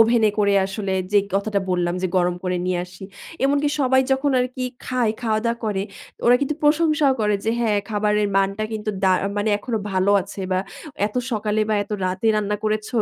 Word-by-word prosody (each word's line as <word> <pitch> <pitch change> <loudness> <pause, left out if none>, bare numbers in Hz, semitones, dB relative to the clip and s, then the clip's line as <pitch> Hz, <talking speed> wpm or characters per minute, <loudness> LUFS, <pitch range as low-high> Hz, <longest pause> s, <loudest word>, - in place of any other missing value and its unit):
ওভেনে 225 -1 +5
করে 200 -1 +3
আসলে 195 -1 -3 0.2
যে 205 - +6 0.2
কথাটা 200 0 0
বললাম, 175 -1 0
যে - - +2
গরম 175 0 +2
করে 180 0 0
নিয়ে 180 -1 0
আসি। 180 +1 -12 0.4
এমনকি 285 +1 +2
সবাই 260 0 +4
যখন 275 +2 +1
আরকি 255 0 -3 0.2
খায়, 245 -4 0
খাওয়া 220 -2 +1
দাওয়া 235 0 0
করে 200 -3 -1 0.4
ওরা 245 - +7
কিন্তু 285 +2 0
প্রশংসাও 300 -2 +3
করে, 210 -1 +2
যে 225 - +1
হ্যাঁ, 215 -3 +2
খাবারের 210 0 +1
মানটা 195 +2 +1
কিন্তু 215 0 -2
দা 190 - +5 0.2
মানে 205 +1 0
এখনো 225 0 -3
ভালো 190 +2 +2
আছে 200 +1 -9
বা 185 - +2 0.5
এত 210 - -8 0.2
সকালে 215 0 0
বা 215 - +2
এত 200 - -14 0.2
রাতে 185 +4 -2
রান্না 210 0 0
করেছ, 215 0 -1
215 Hz, 190 wpm, -22 LUFS, 195-240 Hz, 0.5 s, ওরা